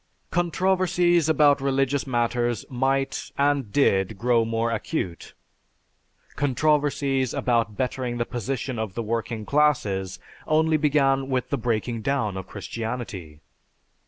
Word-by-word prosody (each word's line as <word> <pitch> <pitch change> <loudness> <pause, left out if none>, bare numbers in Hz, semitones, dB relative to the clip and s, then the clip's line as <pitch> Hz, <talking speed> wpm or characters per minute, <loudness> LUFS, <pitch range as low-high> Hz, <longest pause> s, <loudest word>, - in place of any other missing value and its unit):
Controversies 175 -1 +2
about 145 -2 +4
religious 135 0 0
matters 120 -2 0
might, 135 +2 -1
and 140 -6 +1
did, 100 -7 +2
grow 120 +2 +2
more 115 +1 -1
acute; 105 - -4 1.0
controversies 140 -2 +1
about 115 -4 0
bettering 125 -1 -2
the 120 - 0
position 130 0 -3
of 110 -4 -4
the 115 - -2
working 115 0 -3
classes 105 -10 +1 0.3
only 160 +1 +3
began 135 -3 +2
with 130 -2 -1
the - - +2
breaking 115 0 -1
down 110 -5 -1
of 95 -1 -6
Christianity. 110 -10 -6
130 Hz, 115 wpm, -25 LUFS, 115-145 Hz, 1.0 s, about